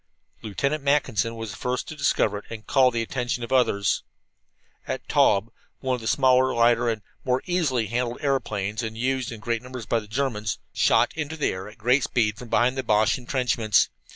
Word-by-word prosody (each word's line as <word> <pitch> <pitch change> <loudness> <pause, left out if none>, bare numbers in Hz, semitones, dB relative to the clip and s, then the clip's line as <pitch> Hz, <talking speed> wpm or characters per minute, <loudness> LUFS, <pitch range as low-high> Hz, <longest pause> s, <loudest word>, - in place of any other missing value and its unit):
Lieutenant 140 +8 -2
Mackinson 115 -6 +1
was 115 -2 -6
the 100 - -9
first 125 0 -2
to 155 - -7
discover 105 -7 +1
it - - -17
and 110 -1 -8
call 130 -2 +4
the 115 -2 -1
attention 120 0 -3
of 115 - -5
the 130 - +2
others. 100 -6 +2 0.9
A - - -1
Taube, 105 +2 +2 0.3
one 130 -1 -1
of 125 - -2
the 110 - -5
smaller, 130 0 +3
lighter, 120 0 +3
and 110 -2 -3 0.2
more 130 0 0
easily 155 -10 0
handled 120 +2 -2
aeroplanes, 110 -7 -1
and 110 -1 -5
used 130 +2 -1
in 115 - -7
great 115 +1 -2
numbers 125 -2 -8
by 115 - +1
the 105 - -11
Germans, 110 -3 -2 0.2
shot - - +3
into 160 0 -4
the 150 - +1
air 95 +2 -6
at 105 - -16
great 125 +5 +2
speed 110 -3 0
from 125 - -9
behind 125 +4 +2
the - - -1
Boche 110 +2 +2
entrenchments. 120 -4 +1
120 Hz, 200 wpm, -25 LUFS, 110-130 Hz, 0.9 s, call